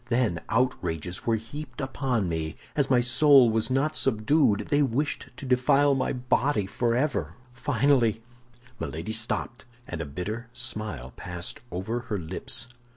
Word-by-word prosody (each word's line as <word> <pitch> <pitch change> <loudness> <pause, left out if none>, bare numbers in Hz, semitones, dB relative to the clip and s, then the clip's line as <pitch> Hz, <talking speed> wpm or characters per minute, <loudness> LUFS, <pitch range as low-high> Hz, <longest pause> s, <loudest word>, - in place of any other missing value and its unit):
Then 115 -8 +1
outrages 90 -9 -1
were 115 - +4
heaped 120 +4 -7
upon 130 -6 -1
me, 80 -1 -3
and - - -27 0.2
as 140 -2 +1
my 125 -2 +5
soul 130 0 +6
was 110 +1 +1
not 135 +4 +1
subdued 110 -1 +2
they 145 0 +3
wished 140 +2 -1
to - - -7
defile 135 +3 +4
my 135 -1 0
body 125 -2 +1
forever. 120 +7 0 0.2
Finally—" 120 -3 +2 0.6
Milady 85 +8 -4
stopped, 115 +2 -1 0.2
and 85 -2 -4
a - - -3
bitter 105 - -5
smile 105 - -3
passed 90 -1 -6
over 100 +7 -2
her 120 -3 -4
lips. 80 +6 -2
120 Hz, 145 wpm, -27 LUFS, 100-135 Hz, 0.6 s, soul